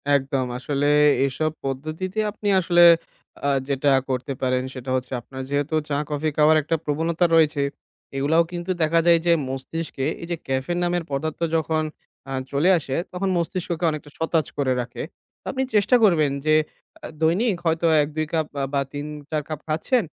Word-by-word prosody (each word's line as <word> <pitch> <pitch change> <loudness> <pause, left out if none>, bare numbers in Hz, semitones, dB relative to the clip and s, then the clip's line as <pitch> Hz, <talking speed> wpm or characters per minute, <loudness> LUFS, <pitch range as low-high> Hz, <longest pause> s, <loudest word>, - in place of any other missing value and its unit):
একদম। 135 -1 0
আসলে 140 +2 -1 0.4
এইসব 155 +4 0
পদ্ধতিতে 155 +9 -3
আপনি 210 0 -6
আসলে 175 -1 +4 0.6
আ - - +3 0.2
যেটা 140 +1 +1 0.2
করতে 130 +1 -2
পারেন 130 -1 +1
সেটা 130 0 -7
হচ্ছে 130 0 -3
আপনার 130 +2 -8
যেহেতু 145 +2 -1
চা-কফি 150 +1 -1
খাওয়ার 155 +1 +6
একটা 165 +3 -1
প্রবণতা 160 +4 +1
রয়েছে। 155 -3 +3 0.6
এগুলাও 160 +5 +3
কিন্তু 175 +1 -3
দেখা 165 +1 +3
যায় 170 -1 +6
যে 170 - +4 0.2
মস্তিষ্কে 135 +1 -4 0.2
এইযে 170 0 -3
ক্যাফেন 135 +6 -1
নামের 175 0 0
পদার্থ 155 +3 -3 0.2
যখন 160 0 +1 0.5
আ - - -6 0.2
চলে 145 +6 +2
আসে 135 -4 -3 0.2
তখন 190 +2 -1
মস্তিষ্ককে 170 0 -2
অনেকটা 150 -1 -7
সতেজ 165 -1 +1
করে 130 -3 +1
রাখে। 120 0 -6 0.5
আপনি 265 0 -1
চেষ্টা 210 +4 +4
করবেন 155 -8 +4
যে 155 0 +4 0.5
আ - - -6 0.2
দৈনিক 185 +6 +2
হয়তো 165 +1 +1 0.2
১-২ 155 +2 -2
কাপ 160 -1 +1 0.3
বা 140 - +2
৩-৪ 150 +1 -4
কাপ 155 - -4
খাচ্ছেন। 165 +11 +1
155 Hz, 155 wpm, -23 LUFS, 140-170 Hz, 0.6 s, খাওয়ার